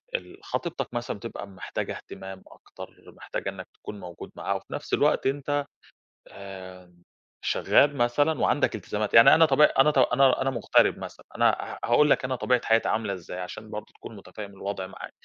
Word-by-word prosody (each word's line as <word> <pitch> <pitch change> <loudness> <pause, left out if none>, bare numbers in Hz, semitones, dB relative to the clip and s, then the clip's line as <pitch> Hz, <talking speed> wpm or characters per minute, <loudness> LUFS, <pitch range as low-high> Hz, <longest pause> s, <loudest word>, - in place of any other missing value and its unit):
ال 385 -6 -6
خطيبتك 170 - -4
مثلًا 120 -2 -3
بتبقى 100 -1 -7
محتاجة 95 -2 -5
اهتمام 95 0 -10
أكتر، - - -12 0.3
محتاجة - - -5
إنك - - -8
تكون 105 - -9
موجود 90 -3 -10
معاها، - - -2
وفي - - -7
نفس - - -6
الوقت - - +3
أنت 145 +1 -1 0.6
آآ، 95 -2 -11 0.5
شغال 145 0 +3
مثلًا 145 +6 +2
وعندك 145 - +2
التزامات، 105 +1 -3
يعني 115 - +9
أنا 165 - +6
طبيع 150 0 +5
أنا 150 +3 +6
ط 145 - -3
أنا 130 +1 +4
أنا 135 - +1
مغترب 120 -5 +3
مثلًا، - - -9
أنا - - +4
ه - - -6
هاقول 150 +5 +5
لك 135 - +3
أنا 130 0 -1
طبيعة 125 0 +1
حياتي 115 0 +3
عاملة 110 -3 -1
إزاي، 90 0 -7
عشان 105 +4 -7
برضو 105 0 -7
تكون 115 - -11
متفهم 100 +1 -9
الوضع 100 -1 -5
معايا، - - -10
115 Hz, 175 wpm, -26 LUFS, 100-135 Hz, 0.6 s, يعني